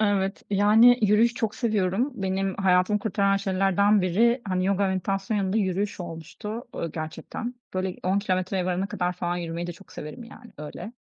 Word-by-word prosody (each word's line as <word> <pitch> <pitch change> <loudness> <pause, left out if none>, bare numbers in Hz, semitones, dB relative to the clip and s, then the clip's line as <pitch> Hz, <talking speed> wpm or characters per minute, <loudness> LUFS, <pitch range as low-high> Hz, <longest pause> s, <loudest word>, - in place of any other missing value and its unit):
Evet, 200 -2 +1
yani, 220 +5 +6
yürüyüş 215 +3 +4
çok 225 -3 -2
seviyorum. 215 +2 0
Benim 195 -2 -1
hayatımı 190 +2 +3
kurtaran 200 -1 +1
şeylerden 195 +1 +2
biri, 230 +8 +3
hani, 185 0 0
yoga, 200 0 +2
meditasyonun 195 +3 -1
yanında 190 +1 0
yürüyüş 200 +1 -1
olmuştu, 175 +7 -7
ııı, 165 - -3
gerçekten. 165 +9 -5 0.2
Böyle, 185 0 -2
10 190 +2 +2
kilometreye 185 -2 -1
varana 185 +2 -1
kadar 180 -2 -2
falan 175 0 -2
yürümeyi 170 0 -4
de 175 - -4
çok 195 - -17
severim, 230 +11 -8
yani, 235 +1 -14
öyle. 150 +9 -7
195 Hz, 165 wpm, -26 LUFS, 185-210 Hz, 0.2 s, yani